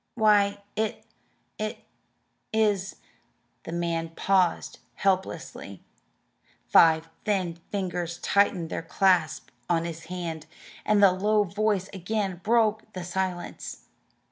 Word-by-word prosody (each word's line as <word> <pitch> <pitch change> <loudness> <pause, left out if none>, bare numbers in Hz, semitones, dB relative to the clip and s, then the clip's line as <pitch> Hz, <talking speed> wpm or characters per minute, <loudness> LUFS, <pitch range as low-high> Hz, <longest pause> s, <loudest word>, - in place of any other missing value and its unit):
"Why, 205 -3 +3
it 220 0 -2 0.5
it 215 0 -3 0.7
is 210 -3 +1 0.4
" - - -44
The - - -6
man 170 -1 -1
paused 190 -3 +1 0.2
helplessly. 190 -1 -2 0.8
Five 160 -1 +5 0.2
thin 185 -5 -1
fingers 175 -3 -3
tightened 185 -4 +1
their - - -2
clasp 170 -2 +1 0.2
on 165 -1 +2
his 165 -1 -6
hand, 170 -3 -5 0.4
and 210 -1 +4
the 195 - +8
low 210 +3 +2
voice 205 0 0
again 190 -1 -2
broke 220 -1 +2
the 185 - -5
silence. 180 0 -4
190 Hz, 110 wpm, -27 LUFS, 170-205 Hz, 0.8 s, the